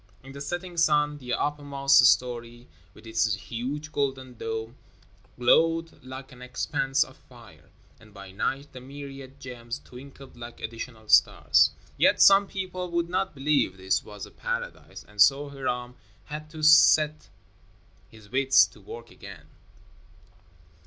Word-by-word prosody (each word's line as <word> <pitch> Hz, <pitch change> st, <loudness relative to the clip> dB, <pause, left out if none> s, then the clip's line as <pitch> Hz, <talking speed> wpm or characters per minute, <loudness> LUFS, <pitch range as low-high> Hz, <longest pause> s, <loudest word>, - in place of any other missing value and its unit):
In 135 Hz, -, -11 dB
the 140 Hz, +1 st, -9 dB
setting 175 Hz, +4 st, -5 dB
sun 150 Hz, -2 st, +2 dB
the 125 Hz, -2 st, -5 dB
uppermost 140 Hz, -2 st, +2 dB
story, 120 Hz, 0 st, 0 dB, 0.3 s
with -, -, -16 dB
its 110 Hz, -1 st, 0 dB
huge 130 Hz, +8 st, -6 dB
golden 135 Hz, -3 st, -2 dB
dome, 110 Hz, +1 st, -5 dB, 0.6 s
glowed 165 Hz, +6 st, +2 dB
like 130 Hz, +1 st, -9 dB
an 125 Hz, -1 st, -14 dB
expanse 135 Hz, +2 st, -1 dB
of -, -, -15 dB
fire; -, -, -18 dB, 0.3 s
and 110 Hz, -1 st, -18 dB
by 100 Hz, -1 st, -12 dB
night, 135 Hz, +8 st, -3 dB
the 130 Hz, -, -10 dB
myriad 135 Hz, 0 st, -10 dB
gems 120 Hz, -2 st, -7 dB
twinkled 135 Hz, +1 st, -13 dB
like 120 Hz, 0 st, -10 dB
additional 115 Hz, -1 st, -8 dB
stars. 70 Hz, -7 st, +5 dB, 0.3 s
Yet -, -, +3 dB
some 200 Hz, 0 st, +7 dB
people 185 Hz, -2 st, -5 dB
would 170 Hz, 0 st, -1 dB
not 185 Hz, -1 st, -2 dB
believe 135 Hz, -8 st, +1 dB
this 95 Hz, 0 st, 0 dB
was 105 Hz, -1 st, -9 dB
a -, -, -16 dB
paradise, -, -, -6 dB
and 105 Hz, -1 st, -3 dB
so 140 Hz, +7 st, +5 dB
Hiram 125 Hz, -3 st, -4 dB, 0.3 s
had 155 Hz, +1 st, -8 dB
to 155 Hz, -1 st, -9 dB
set 155 Hz, 0 st, +5 dB, 0.8 s
his 110 Hz, -2 st, -17 dB
wits 135 Hz, -5 st, +5 dB
to 105 Hz, -, -18 dB
work 115 Hz, +4 st, -11 dB
again. 85 Hz, -7 st, -13 dB
135 Hz, 140 wpm, -26 LUFS, 115-150 Hz, 0.8 s, some